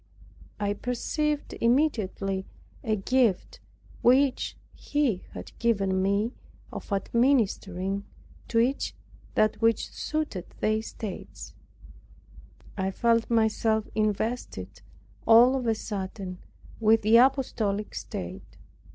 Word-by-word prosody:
I 205 Hz, 0 st, 0 dB
perceived 290 Hz, +6 st, -2 dB
immediately 215 Hz, -7 st, +1 dB, 0.4 s
a 220 Hz, -1 st, +1 dB
gift 245 Hz, -, +1 dB, 0.4 s
which 260 Hz, +2 st, +3 dB, 0.2 s
He 280 Hz, -10 st, -1 dB
had -, -, -8 dB
given 195 Hz, -5 st, +1 dB
me, 200 Hz, +5 st, +1 dB, 0.4 s
of -, -, -8 dB
administering 200 Hz, -4 st, +1 dB, 0.4 s
to 230 Hz, -, -1 dB
each 250 Hz, +4 st, +1 dB, 0.4 s
that 215 Hz, +1 st, +2 dB
which 225 Hz, 0 st, +2 dB
suited 305 Hz, -, -3 dB
their 215 Hz, 0 st, +1 dB
states. 215 Hz, -3 st, -8 dB, 1.2 s
I 190 Hz, -1 st, -1 dB
felt 230 Hz, +3 st, +1 dB
myself 220 Hz, -1 st, +2 dB
invested, 215 Hz, +3 st, -2 dB, 0.5 s
all 240 Hz, +3 st, +7 dB
of 255 Hz, -3 st, -2 dB
a 225 Hz, -, +2 dB
sudden, 190 Hz, -3 st, -5 dB, 0.4 s
with 220 Hz, 0 st, +4 dB
the 220 Hz, +2 st, +6 dB
apostolic 235 Hz, -6 st, +2 dB
state. -, -, -7 dB
220 Hz, 100 wpm, -27 LUFS, 200-245 Hz, 1.2 s, all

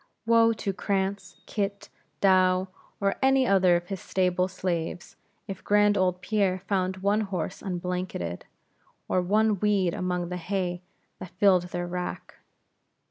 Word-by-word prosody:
Woe 230 Hz, 0 st, +5 dB
to 205 Hz, -2 st, -3 dB
Cranz, 195 Hz, 0 st, -2 dB
Kit, 200 Hz, -1 st, -3 dB, 0.3 s
Douw, 185 Hz, -1 st, +4 dB, 0.3 s
or 200 Hz, -1 st, 0 dB
any 265 Hz, 0 st, +4 dB
other 190 Hz, -5 st, +4 dB
of 175 Hz, 0 st, -3 dB
his 195 Hz, -2 st, -4 dB
stable 180 Hz, -1 st, +1 dB
slaves, 175 Hz, -2 st, -4 dB, 0.3 s
if 195 Hz, -1 st, -7 dB
grand 205 Hz, 0 st, +4 dB
old 185 Hz, -2 st, +1 dB
Pierre 195 Hz, -2 st, +1 dB
found 190 Hz, -2 st, -1 dB
one 205 Hz, +2 st, +2 dB
horse 190 Hz, -3 st, -4 dB
unblanketed, 180 Hz, -, -4 dB, 0.6 s
or 185 Hz, -, +1 dB
one 210 Hz, +2 st, +2 dB
weed 195 Hz, -4 st, +2 dB
among 180 Hz, -1 st, -2 dB
the 180 Hz, -, -3 dB
hay 180 Hz, -1 st, -2 dB, 0.4 s
that 185 Hz, -, -8 dB
filled 185 Hz, -3 st, +4 dB
their 175 Hz, 0 st, -4 dB
rack. 180 Hz, 0 st, -5 dB
185 Hz, 135 wpm, -27 LUFS, 180-200 Hz, 0.6 s, Woe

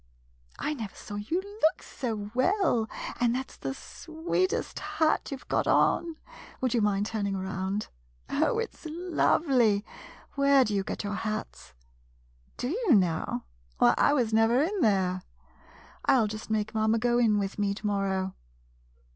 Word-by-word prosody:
I 305 Hz, -, -2 dB
never 225 Hz, -8 st, -6 dB
saw 210 Hz, -, -9 dB
you 215 Hz, -, -2 dB, 0.2 s
look 320 Hz, +3 st, +3 dB
so 215 Hz, -5 st, -4 dB
well, 255 Hz, -, +2 dB, 0.3 s
and 240 Hz, 0 st, +2 dB
that 260 Hz, +1 st, -4 dB
's -, -, -15 dB
the 135 Hz, 0 st, -4 dB
sweetest 345 Hz, -, -2 dB
hat 315 Hz, -1 st, 0 dB
you 275 Hz, -, -4 dB
've -, -, -20 dB
got -, -, 0 dB
on. 335 Hz, -1 st, +3 dB, 0.4 s
Would 255 Hz, -3 st, 0 dB
you 235 Hz, -, +2 dB
mind 205 Hz, -1 st, +1 dB
turning 205 Hz, -3 st, -2 dB
around? 190 Hz, +2 st, -3 dB, 0.4 s
Oh, -, -, +1 dB
it's 455 Hz, -7 st, -4 dB
lovely. 280 Hz, -, +2 dB, 0.5 s
Where 280 Hz, -1 st, +4 dB
do 210 Hz, -, -2 dB
you 195 Hz, -1 st, +1 dB
get -, -, -4 dB
your 205 Hz, 0 st, -3 dB
hats? 70 Hz, -, -5 dB, 0.8 s
Do 245 Hz, -, -2 dB
you, 390 Hz, -, +3 dB
now? 175 Hz, -5 st, +1 dB, 0.3 s
Why, -, -, +5 dB
I -, -, +4 dB, 0.2 s
never 225 Hz, +2 st, +4 dB
was 300 Hz, +6 st, +3 dB
in 410 Hz, -3 st, -2 dB
there. 190 Hz, -5 st, +2 dB, 0.8 s
I -, -, +5 dB
'11 230 Hz, -5 st, +3 dB
just 215 Hz, +1 st, -7 dB
make 215 Hz, 0 st, -1 dB
mamma 220 Hz, +1 st, +2 dB
go 240 Hz, +1 st, +2 dB
in 220 Hz, -3 st, +4 dB
with 200 Hz, 0 st, -2 dB
me 200 Hz, -1 st, +1 dB
to 215 Hz, -, -9 dB
morrow. 195 Hz, -2 st, 0 dB
220 Hz, 160 wpm, -28 LUFS, 200-280 Hz, 0.8 s, Why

